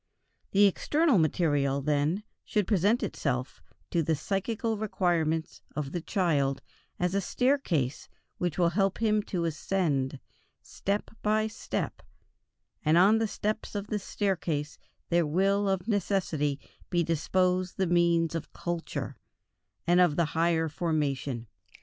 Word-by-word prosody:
The 205 +1 +5
external 290 - +3
material, 145 -4 +2
then, 150 +7 0 0.2
should 210 -3 0
present 205 +4 +2
itself 130 -2 -2 0.3
to 170 - +2
the 160 0 +1
psychical 210 +7 -1
requirements 170 -6 0
of 145 -2 -3
the 175 - -3
child 145 -7 0 0.4
as 180 +1 0
a 200 - +1
staircase 185 - 0 0.3
which 175 -3 -1
helps 185 +2 +2
him 215 -2 +2
to 180 -4 -2
ascend, 150 -5 -1 0.4
step 200 +1 -3
by 215 +1 +2
step, 220 - -4 0.8
and 155 0 +4
on 205 +5 +6
the 225 - +1
steps 210 +1 -3
of 205 0 -4
this 210 -2 -2
staircase 170 -8 -2 0.3
there 170 -2 +3
will 195 +5 +2
of 190 0 -1
necessity 175 -9 0 0.3
be 175 -2 +2
disposed 180 +3 +1
the 190 - +2
means 170 -1 +3
of 165 -2 -4
culture, 170 -1 -4 0.7
and 175 +1 +5
of 175 -5 +4
the 170 - +2
higher 165 0 +2
formation. 145 -6 -1
175 Hz, 130 wpm, -29 LUFS, 155-200 Hz, 0.8 s, on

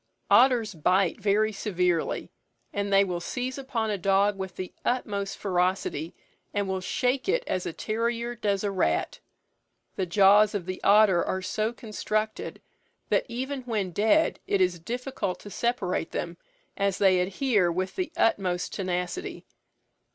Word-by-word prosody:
Otters 240 -5 +5
bite 180 +4 +1
very 210 +2 +2
severely, 180 -5 -1 0.4
and 200 0 -2
they 195 0 +6
will 180 -3 -2
seize 255 +8 -4
upon 235 -5 -2
a 205 - -2
dog 195 +2 +3
with 190 -1 -6
the 185 - -6
utmost 205 -5 -1
ferocity, 180 -4 -1 0.4
and 205 -1 0
will 190 -1 -2
shake 255 - 0
it - - +2
as 185 - -2
a - - -2
terrier 235 +5 -2
does 205 -4 -1
a 205 - 0
rat. 80 - 0 0.8
The 190 - -1
jaws 205 +3 +5
of 190 -4 -2
the 185 0 -5
otter 200 -3 +5
are 190 0 -2
so 215 +4 -1
constructed, 215 -1 -3 0.5
that - - +1
even 260 +3 -3
when 215 -7 -2
dead 220 - +2
it 200 - +1
is 180 -2 +2
difficult 240 -1 -4
to 205 - -10
separate 215 -9 -1
them, 170 0 -4 0.4
as 200 -1 0
they 190 -2 +4
adhere 195 0 +1
with 185 +2 -3
the 365 -3 -2
utmost 180 -5 +1
tenacity. 185 - -3
200 Hz, 150 wpm, -27 LUFS, 185-230 Hz, 0.8 s, they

